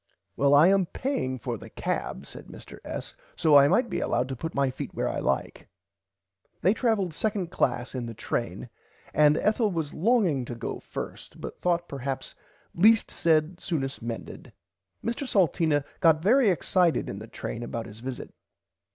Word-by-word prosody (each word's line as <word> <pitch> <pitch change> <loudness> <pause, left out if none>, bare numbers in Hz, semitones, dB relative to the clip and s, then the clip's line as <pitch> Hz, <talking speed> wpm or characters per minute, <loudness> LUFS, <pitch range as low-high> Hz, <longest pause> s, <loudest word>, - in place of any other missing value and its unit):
Well 140 +1 +4
I 155 +5 +7
am 195 -2 +3
paying 165 - -2
for 115 - -4
the - - -11
cab - - -3
said - - -11
Mr - - -12
S. - - -5 0.2
so 155 -2 +4
I 140 0 +8
might 240 - +3
be - - -2
allowed 130 - 0
to 135 - -3
put 160 +6 -5
my 140 -1 +2
feet - - -7
were - - 0
I - - -2
like. - - -2 0.9
They 190 +5 +4
traveled 220 -6 +1
2nd 195 0 -2
class 125 0 0
in 125 -3 -4
the 115 - -7
train - - -4 0.4
and 150 +1 +5
Ethel 215 +1 +2
was 165 -6 -3
longing 185 - +2
to 120 - -6
go 115 - -5
first - - -8
but - - -7
thought 175 -1 0
perhaps 135 -1 -5 0.4
least 215 +5 +4
said 160 +1 +2
soonest 140 -5 -3
mended. 115 0 -7 0.5
Mr 235 +4 -2
Salteena 165 - +2
got 160 -3 +4
very 240 +3 +5
excited 180 -1 +2
in 100 - -5
the 110 - -9
train 115 - -6
about 115 -1 -4
his 105 +2 -11
visit. 130 +1 -6
160 Hz, 170 wpm, -27 LUFS, 135-195 Hz, 0.9 s, I